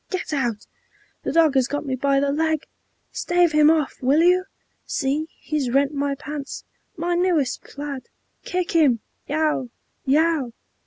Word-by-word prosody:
"Get 370 Hz, -4 st, -3 dB
out!" 240 Hz, -7 st, -1 dB, 0.6 s
"The -, -, -2 dB
dog 320 Hz, -2 st, +4 dB
has 260 Hz, -2 st, +3 dB
got 290 Hz, +2 st, -3 dB
me 265 Hz, -2 st, -1 dB
by 275 Hz, +1 st, +2 dB
the 280 Hz, 0 st, +1 dB
leg!" 315 Hz, +1 st, 0 dB, 0.5 s
"Stave 350 Hz, -1 st, +2 dB
him 305 Hz, 0 st, +5 dB
off! 315 Hz, -3 st, +1 dB
Will 275 Hz, +5 st, +3 dB
you? 365 Hz, +1 st, +4 dB, 0.4 s
See, 290 Hz, +3 st, -1 dB
he's 300 Hz, -5 st, -2 dB
rent 275 Hz, +3 st, +2 dB
my 280 Hz, 0 st, -1 dB
pants, 290 Hz, 0 st, -6 dB, 0.3 s
My 345 Hz, +2 st, -1 dB
newest 345 Hz, -8 st, +1 dB
plaid! 280 Hz, -2 st, -7 dB, 0.3 s
Kick 360 Hz, -1 st, -2 dB
him!" 285 Hz, -9 st, +3 dB, 0.3 s
"Yow, 300 Hz, -4 st, 0 dB, 0.3 s
yow!" 295 Hz, -3 st, +2 dB
295 Hz, 150 wpm, -23 LUFS, 275-320 Hz, 0.6 s, him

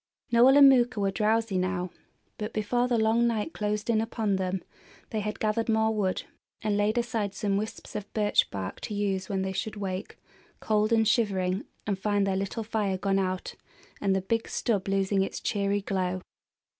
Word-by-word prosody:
Noel 250 Hz, +4 st, +7 dB
and 280 Hz, -1 st, +10 dB
Mooka 245 Hz, -4 st, +4 dB
were 195 Hz, -1 st, +1 dB
drowsy 215 Hz, -1 st, +1 dB
now; 180 Hz, -1 st, -1 dB, 0.5 s
but 210 Hz, +1 st, -4 dB
before 240 Hz, +4 st, +1 dB
the 245 Hz, -2 st, +1 dB
long 225 Hz, +2 st, +3 dB
night 230 Hz, +6 st, -1 dB
closed 210 Hz, 0 st, -2 dB
in 225 Hz, -2 st, +3 dB
upon 220 Hz, -3 st, -1 dB
them 185 Hz, 0 st, -2 dB, 0.5 s
they 220 Hz, -, -1 dB
had 210 Hz, 0 st, -4 dB
gathered 220 Hz, +1 st, 0 dB
more 220 Hz, 0 st, +3 dB
wood, 195 Hz, -3 st, 0 dB, 0.4 s
and 210 Hz, -1 st, +1 dB
laid 205 Hz, +2 st, +1 dB
aside 225 Hz, -4 st, -1 dB
some 200 Hz, 0 st, 0 dB
wisps 215 Hz, +2 st, -5 dB
of 210 Hz, -1 st, -5 dB
birch 210 Hz, -1 st, +2 dB
bark 95 Hz, -1 st, -5 dB
to 210 Hz, -, -4 dB
use 195 Hz, -2 st, -1 dB
when 190 Hz, -2 st, -1 dB
they 190 Hz, 0 st, -2 dB
should 220 Hz, +3 st, -3 dB
wake, 195 Hz, -1 st, -5 dB, 0.4 s
cold 215 Hz, 0 st, +1 dB
and 225 Hz, -1 st, +4 dB
shivering, 190 Hz, -5 st, +1 dB, 0.2 s
and 200 Hz, -2 st, -1 dB
find 205 Hz, 0 st, +1 dB
their 195 Hz, -1 st, 0 dB
little 195 Hz, +4 st, -2 dB
fire 210 Hz, -3 st, -1 dB
gone 195 Hz, +1 st, +1 dB
out 185 Hz, -1 st, -2 dB, 0.5 s
and 195 Hz, -1 st, +2 dB
the 190 Hz, -, +1 dB
big 225 Hz, +4 st, -1 dB
stub 205 Hz, -6 st, -1 dB
losing 195 Hz, 0 st, +1 dB
its 195 Hz, -, -2 dB
cheery 200 Hz, 0 st, 0 dB
glow. 185 Hz, -1 st, -1 dB
205 Hz, 185 wpm, -28 LUFS, 195-220 Hz, 0.5 s, and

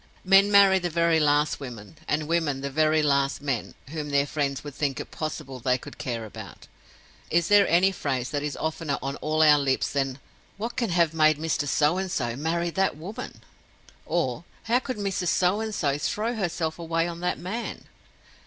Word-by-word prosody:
Men 195 Hz, +2 st, +6 dB
marry 200 Hz, -2 st, +6 dB
the 175 Hz, -1 st, -2 dB
very 170 Hz, 0 st, +2 dB
last 150 Hz, 0 st, +2 dB
women, 120 Hz, -4 st, -9 dB
and 150 Hz, 0 st, -1 dB
women 160 Hz, -5 st, 0 dB
the 140 Hz, 0 st, -4 dB
very 155 Hz, +1 st, +3 dB
last 140 Hz, -1 st, +1 dB
men, 135 Hz, -5 st, -3 dB
whom 150 Hz, -1 st, -5 dB
their 140 Hz, 0 st, +2 dB
friends 140 Hz, -2 st, -2 dB
would 145 Hz, -1 st, -8 dB
think 140 Hz, -1 st, -2 dB
it -, -, -7 dB
possible 135 Hz, -4 st, -5 dB
they 125 Hz, +1 st, +1 dB
could -, -, -12 dB
care 115 Hz, -3 st, -3 dB
about. 105 Hz, -, -10 dB, 0.6 s
Is 170 Hz, +1 st, +1 dB
there 205 Hz, -1 st, +6 dB
any 180 Hz, +3 st, +4 dB
phrase 130 Hz, -8 st, -3 dB
that 145 Hz, -1 st, -1 dB
is 150 Hz, -1 st, -4 dB
oftener 160 Hz, -3 st, -2 dB
on 135 Hz, 0 st, -3 dB
all 155 Hz, +1 st, +1 dB
our 150 Hz, -1 st, +7 dB
lips 135 Hz, -2 st, 0 dB
than 135 Hz, -2 st, -1 dB, 0.4 s
'What 230 Hz, +3 st, -4 dB
can 235 Hz, -4 st, -1 dB
have 170 Hz, -2 st, +2 dB
made 155 Hz, -1 st, +4 dB
Mr. 155 Hz, -2 st, -1 dB
So 150 Hz, +5 st, +2 dB
and 190 Hz, 0 st, -3 dB
So 120 Hz, -6 st, -1 dB
marry 170 Hz, +4 st, -1 dB
that 190 Hz, -3 st, 0 dB
woman?'—or 185 Hz, +8 st, -6 dB, 0.2 s
'How 235 Hz, +2 st, +2 dB
could 255 Hz, -2 st, -5 dB
Mrs. 195 Hz, -3 st, -2 dB
So 180 Hz, +4 st, +2 dB
and 220 Hz, -1 st, -3 dB
So 140 Hz, -5 st, 0 dB
throw 220 Hz, +9 st, -1 dB
herself 170 Hz, -6 st, -2 dB
away 165 Hz, 0 st, 0 dB
on 170 Hz, -1 st, -6 dB
that 180 Hz, +1 st, -1 dB
man? 220 Hz, +7 st, -5 dB
155 Hz, 190 wpm, -26 LUFS, 140-180 Hz, 0.6 s, our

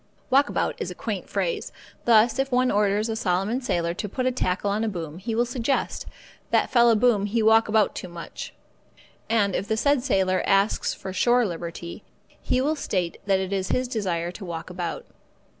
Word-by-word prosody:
Walk 280 Hz, +2 st, +4 dB
about -, -, 0 dB
is -, -, -2 dB
a -, -, -7 dB
quaint -, -, -4 dB
phrase. 480 Hz, -4 st, -2 dB, 0.3 s
Thus, 230 Hz, +1 st, +5 dB
if 270 Hz, 0 st, 0 dB
one 250 Hz, 0 st, +3 dB
orders 205 Hz, +1 st, +2 dB
a 225 Hz, -, -2 dB
Solomon 195 Hz, +5 st, 0 dB
sailor 170 Hz, -9 st, -1 dB
to 210 Hz, +3 st, -5 dB
put 255 Hz, +6 st, -2 dB
a 255 Hz, -, +3 dB
tackle 200 Hz, -4 st, -1 dB
on 210 Hz, +2 st, 0 dB
a 225 Hz, -, 0 dB
boom, 165 Hz, -4 st, -6 dB
he 220 Hz, +3 st, -3 dB
will 240 Hz, +2 st, +2 dB
suggest, 245 Hz, +2 st, -2 dB, 0.4 s
"That -, -, +2 dB
fella 235 Hz, -2 st, +5 dB
boom 215 Hz, -3 st, +3 dB
he 225 Hz, +2 st, 0 dB
walk 225 Hz, +1 st, +5 dB
about 215 Hz, -1 st, +2 dB
too -, -, -6 dB
much." 170 Hz, -1 st, -8 dB, 0.8 s
And 205 Hz, -4 st, +2 dB
if 200 Hz, -, -2 dB
the 220 Hz, -, 0 dB
said 285 Hz, +2 st, +2 dB
sailor 190 Hz, -7 st, +1 dB
asks 195 Hz, +2 st, +2 dB
for 190 Hz, -, -7 dB
shore 240 Hz, +5 st, +3 dB
liberty, 170 Hz, -2 st, -6 dB, 0.2 s
he 255 Hz, -, -2 dB
will 300 Hz, +4 st, +1 dB
state 185 Hz, -, -2 dB
that 195 Hz, -1 st, +3 dB
it 190 Hz, +1 st, -3 dB
is 190 Hz, -1 st, -1 dB
his 255 Hz, 0 st, 0 dB
desire 180 Hz, -8 st, -2 dB
to 195 Hz, -, -10 dB
walk 170 Hz, -1 st, -6 dB
about. 175 Hz, -2 st, -4 dB
210 Hz, 195 wpm, -25 LUFS, 185-240 Hz, 0.8 s, Thus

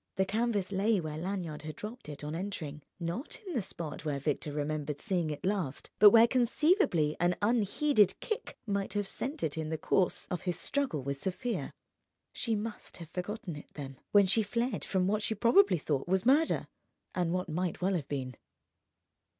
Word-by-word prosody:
The 190 Hz, -, +2 dB
canvas 210 Hz, -1 st, 0 dB
lay 200 Hz, +2 st, +2 dB
where 155 Hz, -2 st, -4 dB
Lanyard 175 Hz, -4 st, -3 dB
had 155 Hz, 0 st, -7 dB
dropped 215 Hz, -2 st, -8 dB
it 150 Hz, 0 st, -8 dB
on 150 Hz, +1 st, -4 dB
entering, 165 Hz, -5 st, -4 dB, 0.2 s
not 175 Hz, -, -4 dB
in 365 Hz, -, -5 dB
the 245 Hz, -, +1 dB
spot 170 Hz, -6 st, -6 dB
where 150 Hz, -3 st, -1 dB
Victor 145 Hz, +1 st, -2 dB
remembered 150 Hz, 0 st, -2 dB
seeing 175 Hz, -3 st, 0 dB
it 150 Hz, +2 st, -5 dB
last, 185 Hz, -9 st, -1 dB
but 210 Hz, -, +11 dB
where 230 Hz, +2 st, +7 dB
conceivably 240 Hz, -, +3 dB
an 175 Hz, +1 st, +3 dB
unheeded 220 Hz, +1 st, +3 dB
kick 435 Hz, -, -4 dB
might 200 Hz, -2 st, -1 dB
have 205 Hz, -1 st, 0 dB
sent 275 Hz, +9 st, -4 dB
it 160 Hz, +1 st, -1 dB
in 155 Hz, -1 st, -3 dB
the 160 Hz, -, -1 dB
course 180 Hz, +4 st, +1 dB
of 180 Hz, -, -2 dB
his 180 Hz, -2 st, -2 dB
struggle 265 Hz, -, -1 dB
with 140 Hz, +1 st, -3 dB
Sofia. 210 Hz, -, -2 dB, 0.6 s
She 230 Hz, -2 st, 0 dB
must 215 Hz, +1 st, -5 dB
have 170 Hz, -2 st, -10 dB
forgotten 180 Hz, -1 st, -4 dB
it, 145 Hz, -, -10 dB
then, 135 Hz, -3 st, -7 dB
when 205 Hz, -1 st, +7 dB
she 205 Hz, +4 st, +5 dB
fled 235 Hz, +1 st, -1 dB
from 185 Hz, -2 st, +1 dB
what 210 Hz, +3 st, +1 dB
she 220 Hz, +1 st, 0 dB
probably 235 Hz, -, +5 dB
thought 145 Hz, -2 st, -1 dB
was 190 Hz, +3 st, +1 dB
murder, 295 Hz, +6 st, +4 dB, 0.5 s
and 175 Hz, -2 st, 0 dB
what 180 Hz, +1 st, -1 dB
might 175 Hz, +2 st, -2 dB
well 190 Hz, +2 st, +1 dB
have 160 Hz, -7 st, -2 dB
been. 130 Hz, -3 st, -3 dB
185 Hz, 185 wpm, -31 LUFS, 155-220 Hz, 0.6 s, but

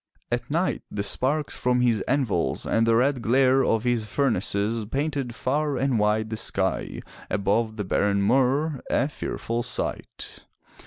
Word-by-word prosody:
At -, -, -2 dB
night -, -, 0 dB
the 100 Hz, -, -3 dB
sparks 140 Hz, +8 st, -1 dB
from 125 Hz, 0 st, +1 dB
his 115 Hz, -4 st, +2 dB
anvils 125 Hz, -11 st, 0 dB
and 115 Hz, 0 st, +2 dB
the 115 Hz, -, +4 dB
red 130 Hz, +2 st, +2 dB
glare 130 Hz, +3 st, +3 dB
of 115 Hz, -3 st, +1 dB
his 120 Hz, -3 st, 0 dB
furnaces 110 Hz, -3 st, 0 dB
painted 140 Hz, 0 st, -2 dB
far 145 Hz, +2 st, -1 dB
and 130 Hz, -3 st, +1 dB
wide 110 Hz, +1 st, +1 dB
the 110 Hz, -, -2 dB
sky 95 Hz, -3 st, -2 dB, 0.3 s
above 110 Hz, +3 st, 0 dB
the 105 Hz, -, -2 dB
barren 100 Hz, +1 st, +1 dB
moor 135 Hz, +5 st, +2 dB
— -, -, -13 dB
a 135 Hz, -, +2 dB
fearful 120 Hz, -5 st, -3 dB
sight. 125 Hz, +1 st, -5 dB
120 Hz, 155 wpm, -25 LUFS, 110-135 Hz, 0.3 s, the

